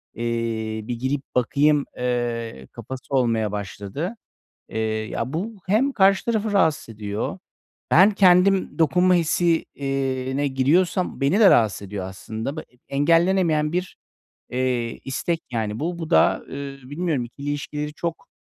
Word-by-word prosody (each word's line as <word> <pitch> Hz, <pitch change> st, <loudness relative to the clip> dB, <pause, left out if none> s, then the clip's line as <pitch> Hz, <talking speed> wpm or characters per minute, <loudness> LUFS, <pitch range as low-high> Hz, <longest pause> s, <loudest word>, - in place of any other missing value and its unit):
Eee, 115 Hz, -2 st, -2 dB
bir 120 Hz, -1 st, -3 dB
girip 135 Hz, +3 st, -1 dB
bakayım." 145 Hz, +4 st, +3 dB
Eee, 120 Hz, -, -2 dB
kafası 130 Hz, +3 st, -8 dB
olmaya 115 Hz, -4 st, +1 dB
başladı. 105 Hz, -, -5 dB, 0.5 s
Eee, -, -, -5 dB, 0.3 s
ya, 125 Hz, +5 st, -3 dB
bu 210 Hz, +7 st, -3 dB
hem 225 Hz, +9 st, +3 dB
karşı 195 Hz, -5 st, +3 dB
tarafı 220 Hz, -2 st, 0 dB
rahatsız 160 Hz, -10 st, +2 dB
ediyor, 105 Hz, 0 st, -4 dB, 0.5 s
ben 185 Hz, +6 st, +7 dB
kendim 190 Hz, -2 st, +4 dB
dokunma 180 Hz, +3 st, +4 dB
hissi, 170 Hz, 0 st, +2 dB
eee, 135 Hz, -1 st, -2 dB
ne 145 Hz, 0 st, +1 dB
giriyorsam 165 Hz, +8 st, +1 dB
beni 145 Hz, +11 st, +2 dB
de 200 Hz, -, +8 dB
rahatsız 110 Hz, -3 st, +3 dB
ediyor 100 Hz, -1 st, -5 dB
aslında. 110 Hz, -, -6 dB
B -, -, -4 dB, 0.3 s
engellenemeyen 165 Hz, +1 st, +2 dB
bir, 180 Hz, +1 st, -3 dB, 0.5 s
eee, 125 Hz, -2 st, -1 dB
istek, 165 Hz, +5 st, -2 dB
yani, 110 Hz, -2 st, -2 dB
bu. 170 Hz, +3 st, -3 dB
Bu 165 Hz, 0 st, -5 dB
da, -, -, +4 dB
eee, 140 Hz, 0 st, -6 dB
bilmiyorum 145 Hz, 0 st, -2 dB
ikili 140 Hz, +4 st, -7 dB
ilişkileri 150 Hz, +1 st, -4 dB
çok, 170 Hz, +1 st, -5 dB
140 Hz, 135 wpm, -23 LUFS, 120-175 Hz, 0.5 s, de